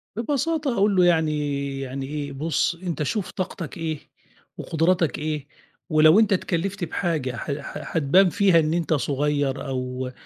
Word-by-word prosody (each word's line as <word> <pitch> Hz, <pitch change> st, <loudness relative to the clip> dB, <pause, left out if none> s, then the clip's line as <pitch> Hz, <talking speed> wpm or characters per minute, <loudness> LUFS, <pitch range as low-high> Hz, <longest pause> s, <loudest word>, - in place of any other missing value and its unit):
ببساطة 290 Hz, +4 st, -1 dB
هاقول 200 Hz, 0 st, +3 dB
له 180 Hz, -1 st, +5 dB
يعني 150 Hz, -4 st, 0 dB
يعني 135 Hz, 0 st, -4 dB
إيه 145 Hz, 0 st, -4 dB
بُص 160 Hz, +4 st, 0 dB
أنت 170 Hz, -4 st, -3 dB
شوف 190 Hz, +6 st, -2 dB
طاقتك 180 Hz, -5 st, -5 dB
إيه، 160 Hz, -3 st, -3 dB, 0.6 s
وقدراتك 165 Hz, -2 st, +1 dB
إيه 150 Hz, -2 st, -3 dB, 0.4 s
ولو 155 Hz, +4 st, +6 dB
أنت 215 Hz, -3 st, +4 dB
اتكلفت 190 Hz, +1 st, -1 dB
بحاجة 155 Hz, -7 st, -2 dB
ح 140 Hz, -, -4 dB
ح 140 Hz, +4 st, -6 dB
هتبان 180 Hz, +6 st, +5 dB
فيها 185 Hz, -1 st, +4 dB
إن 155 Hz, 0 st, +1 dB
أنت 170 Hz, -2 st, 0 dB
صغير 145 Hz, 0 st, 0 dB
أو 125 Hz, -1 st, -3 dB
155 Hz, 145 wpm, -24 LUFS, 140-185 Hz, 0.6 s, ولو